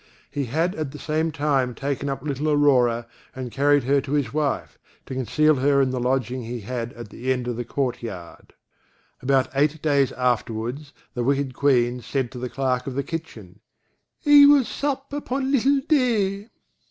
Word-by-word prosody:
He 140 Hz, -2 st, -2 dB
had 160 Hz, +9 st, 0 dB
at 155 Hz, -6 st, -4 dB
the -, -, -7 dB
same 160 Hz, +2 st, -1 dB
time 140 Hz, -4 st, 0 dB
taken 140 Hz, 0 st, -3 dB
up 135 Hz, -, -4 dB
little 150 Hz, +1 st, -2 dB
Aurora, 125 Hz, -6 st, +3 dB, 0.3 s
and 130 Hz, -2 st, -6 dB
carried 145 Hz, +1 st, +3 dB
her 140 Hz, +2 st, +2 dB
to 135 Hz, +1 st, -5 dB
his 140 Hz, -5 st, 0 dB
wife, 150 Hz, -3 st, -2 dB, 0.3 s
to -, -, -7 dB
conceal 150 Hz, +4 st, +2 dB
her 140 Hz, +2 st, +3 dB
in 135 Hz, -2 st, +2 dB
the 130 Hz, -, -2 dB
lodging 125 Hz, 0 st, -1 dB
he 120 Hz, 0 st, -6 dB
had 120 Hz, +2 st, -4 dB
at 120 Hz, -3 st, -10 dB
the 130 Hz, +4 st, -3 dB
end 125 Hz, -1 st, -1 dB
of 120 Hz, -, -2 dB
the 120 Hz, -, -3 dB
court 125 Hz, 0 st, -2 dB
yard. 95 Hz, -7 st, -9 dB, 0.7 s
About 130 Hz, 0 st, +2 dB
eight 150 Hz, +3 st, +1 dB
days 140 Hz, -3 st, +2 dB
afterwards, 125 Hz, +3 st, -2 dB, 0.2 s
the 120 Hz, -, -2 dB
wicked 140 Hz, 0 st, 0 dB
Queen 125 Hz, -3 st, +2 dB
said 130 Hz, +1 st, -2 dB
to 125 Hz, -, -8 dB
the 125 Hz, 0 st, -4 dB
clerk 130 Hz, -1 st, -1 dB
of 130 Hz, -, -4 dB
the 140 Hz, -, -1 dB
kitchen: 110 Hz, -, -7 dB, 0.7 s
"I 290 Hz, -1 st, +9 dB
will 285 Hz, -3 st, +6 dB
sup 280 Hz, +1 st, -3 dB
upon 270 Hz, -2 st, -2 dB
little 275 Hz, +1 st, +3 dB
Day." 215 Hz, -8 st, +1 dB
135 Hz, 180 wpm, -23 LUFS, 125-155 Hz, 0.7 s, I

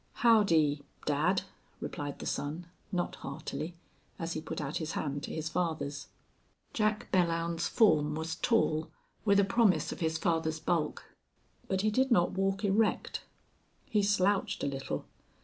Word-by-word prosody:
"Howdy 165 Hz, -11 st, +5 dB, 0.2 s
dad!" 160 Hz, +7 st, +2 dB, 0.4 s
replied 145 Hz, -1 st, -5 dB
the -, -, -7 dB
son, 155 Hz, +5 st, -3 dB, 0.3 s
not 180 Hz, -2 st, -1 dB
heartily, 155 Hz, +4 st, -5 dB, 0.4 s
as 165 Hz, 0 st, -3 dB
he 155 Hz, -, -3 dB
put -, -, -5 dB
out 150 Hz, 0 st, -2 dB
his 160 Hz, -1 st, -3 dB
hand 145 Hz, -1 st, -2 dB
to -, -, -6 dB
his 160 Hz, 0 st, -3 dB
father's. 155 Hz, -4 st, -2 dB, 0.7 s
Jack 215 Hz, -1 st, 0 dB
Belllounds's 170 Hz, -2 st, +1 dB
form 155 Hz, -9 st, +4 dB
was 160 Hz, +1 st, -3 dB
tall, 160 Hz, -5 st, +1 dB, 0.4 s
with 200 Hz, -1 st, +5 dB
a -, -, +6 dB
promise 210 Hz, -1 st, +3 dB
of -, -, -6 dB
his 160 Hz, -2 st, 0 dB
father's 160 Hz, -2 st, 0 dB
bulk. 165 Hz, -1 st, -1 dB, 0.6 s
But 190 Hz, -1 st, 0 dB
he 215 Hz, +1 st, +2 dB
did 260 Hz, +4 st, +2 dB
not 175 Hz, -8 st, +4 dB
walk 195 Hz, +2 st, 0 dB
erect; 210 Hz, +2 st, +1 dB, 0.6 s
he 210 Hz, -, +1 dB
slouched 200 Hz, -1 st, +2 dB
a -, -, +1 dB
little. 135 Hz, -1 st, -3 dB
170 Hz, 150 wpm, -31 LUFS, 155-200 Hz, 0.7 s, a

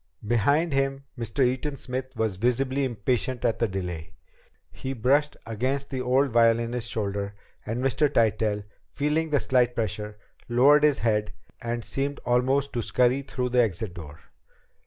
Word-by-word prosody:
Behind 140 Hz, -, +2 dB
him, 135 Hz, 0 st, 0 dB
Mr. 120 Hz, +2 st, 0 dB
Eaton 130 Hz, +4 st, -1 dB
Smith 130 Hz, 0 st, -5 dB
was 110 Hz, -4 st, -1 dB
visibly 130 Hz, +5 st, +1 dB
impatient 125 Hz, +1 st, -1 dB
at 115 Hz, -, +1 dB
the 115 Hz, -, +2 dB
delay. 90 Hz, -5 st, -5 dB, 0.6 s
He 130 Hz, -, -5 dB
brushed 140 Hz, +5 st, +2 dB
against 130 Hz, +6 st, -2 dB
the 130 Hz, -2 st, -2 dB
old 130 Hz, +2 st, +2 dB
violinist's 115 Hz, +1 st, +2 dB
shoulder, 100 Hz, -1 st, -2 dB, 0.3 s
and 120 Hz, +3 st, -2 dB
Mr. 135 Hz, +3 st, +2 dB
Tytell, 110 Hz, -3 st, +1 dB, 0.3 s
feeling 150 Hz, +3 st, 0 dB
the 145 Hz, -2 st, +2 dB
slight 125 Hz, -2 st, +2 dB
pressure, 105 Hz, -2 st, -3 dB, 0.3 s
lowered 140 Hz, +5 st, +5 dB
his 150 Hz, -2 st, +4 dB
head 105 Hz, -2 st, 0 dB, 0.3 s
and 120 Hz, -1 st, -3 dB
seemed 140 Hz, +1 st, -2 dB
almost 130 Hz, +3 st, +1 dB
to 120 Hz, -, -1 dB
scurry 125 Hz, +4 st, +2 dB
through 125 Hz, -2 st, -3 dB
the 125 Hz, 0 st, +4 dB
exit 105 Hz, -3 st, -1 dB
door. 80 Hz, -3 st, -10 dB
125 Hz, 150 wpm, -26 LUFS, 110-135 Hz, 0.6 s, lowered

